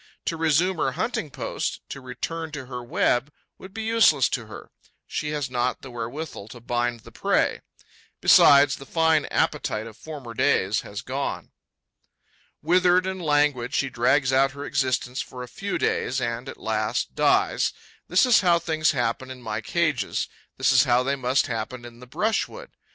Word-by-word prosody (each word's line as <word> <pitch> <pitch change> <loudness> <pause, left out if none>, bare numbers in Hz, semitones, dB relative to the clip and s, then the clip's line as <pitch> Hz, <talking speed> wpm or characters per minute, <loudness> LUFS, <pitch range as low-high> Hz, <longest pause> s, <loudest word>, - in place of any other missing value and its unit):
To 165 - -1
resume 165 +3 +2
her 135 -4 0
hunting 165 - -2
post, - - -4
to 135 - -7
return 160 +6 -5
to 145 -3 -6
her 125 -1 -7
web 120 +3 +1 0.3
would 190 - -11
be 220 +3 -5
useless 220 - +4
to 120 -4 -3
her: 110 - -11 0.3
she 150 - -3
has 150 -3 -2
not 125 0 -2
the 130 - -9
wherewithal 120 -1 -6
to 120 +2 -11
bind 120 0 -2
the - - -14
prey. - - 0 0.6
Besides, 140 0 +6
the 135 - -12
fine 160 -2 +2
appetite 110 +1 -1
of 110 -2 -10
former 135 -2 -9
days 100 -2 +2
has 100 +3 -7
gone. 135 +2 -4 1.1
Withered 180 +2 +4
and 190 -1 -4
languid, 145 -5 +1
she 135 -1 0
drags 130 +2 +2
out 135 +1 +3
her 145 0 -7
existence 130 -2 -1
for 125 -1 -8
a - - -8
few 195 +11 -4
days 130 +2 0
and, 120 +1 -3
at - - -9
last, 110 +1 -2
dies. - - +2 0.4
This 180 +7 +4
is 245 -4 +5
how 175 -3 +4
things 160 -2 +1
happen 125 0 -1
in 130 -1 -8
my 110 -1 -3
cages; 155 - -1 0.3
this - - +3
is - - +5
how 120 +1 +3
they 140 +2 0
must 130 0 +1
happen 120 +1 -5
in 120 0 -12
the 125 - -12
brushwood. 225 - -2
135 Hz, 175 wpm, -25 LUFS, 120-160 Hz, 1.1 s, Besides